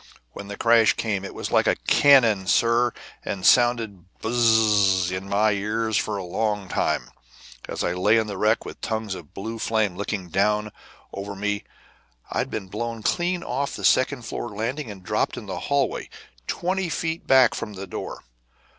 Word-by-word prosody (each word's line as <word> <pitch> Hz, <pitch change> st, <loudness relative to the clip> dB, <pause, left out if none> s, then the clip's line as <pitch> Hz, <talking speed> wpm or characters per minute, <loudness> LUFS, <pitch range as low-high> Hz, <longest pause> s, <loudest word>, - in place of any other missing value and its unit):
when 100 Hz, -, -9 dB
the 100 Hz, 0 st, -7 dB
crash 115 Hz, -1 st, +5 dB
came. 100 Hz, -4 st, -2 dB
It 100 Hz, -, -7 dB
was -, -, -5 dB
like -, -, +3 dB, 0.2 s
cannon, 115 Hz, -9 st, +5 dB
sir, 120 Hz, +4 st, +3 dB, 0.3 s
and 95 Hz, -2 st, -4 dB
sounded 115 Hz, -6 st, +3 dB, 0.2 s
bzzzzzzzz 105 Hz, -5 st, +3 dB
in 95 Hz, +1 st, -6 dB
my 105 Hz, +2 st, +3 dB
ears 110 Hz, +2 st, -1 dB
for 105 Hz, 0 st, 0 dB
a 95 Hz, -, -4 dB
long 105 Hz, +2 st, -2 dB
time, -, -, -1 dB, 0.6 s
as -, -, -3 dB
I 90 Hz, -, 0 dB
lay 105 Hz, +5 st, +3 dB
in 110 Hz, -, +2 dB
the 105 Hz, -2 st, -5 dB
wreck, 110 Hz, +1 st, +2 dB
with -, -, -9 dB
tongues 110 Hz, -3 st, -2 dB
of 90 Hz, -1 st, -11 dB
blue 110 Hz, +3 st, -5 dB
flames 110 Hz, -5 st, 0 dB
licking 100 Hz, -3 st, -3 dB
down 105 Hz, +3 st, +1 dB, 0.4 s
over 100 Hz, +1 st, -6 dB
me. 105 Hz, +1 st, -2 dB, 0.7 s
I'd -, -, -1 dB
been 95 Hz, -, -5 dB
blown 115 Hz, +3 st, -5 dB
clean 175 Hz, +4 st, 0 dB
off 140 Hz, +3 st, -2 dB
the -, -, -4 dB
second 130 Hz, -1 st, +3 dB
floor 120 Hz, -, -5 dB
landing 115 Hz, +6 st, -4 dB
and 100 Hz, -3 st, -10 dB
dropped -, -, -1 dB
in -, -, -7 dB
the -, -, -5 dB
hallway, 140 Hz, -3 st, 0 dB, 0.4 s
twenty 185 Hz, 0 st, -1 dB
feet 160 Hz, 0 st, -3 dB
back 130 Hz, -3 st, +6 dB
from 105 Hz, -, -5 dB
the 100 Hz, 0 st, -7 dB
door. 90 Hz, -, -7 dB
110 Hz, 170 wpm, -24 LUFS, 100-120 Hz, 0.7 s, back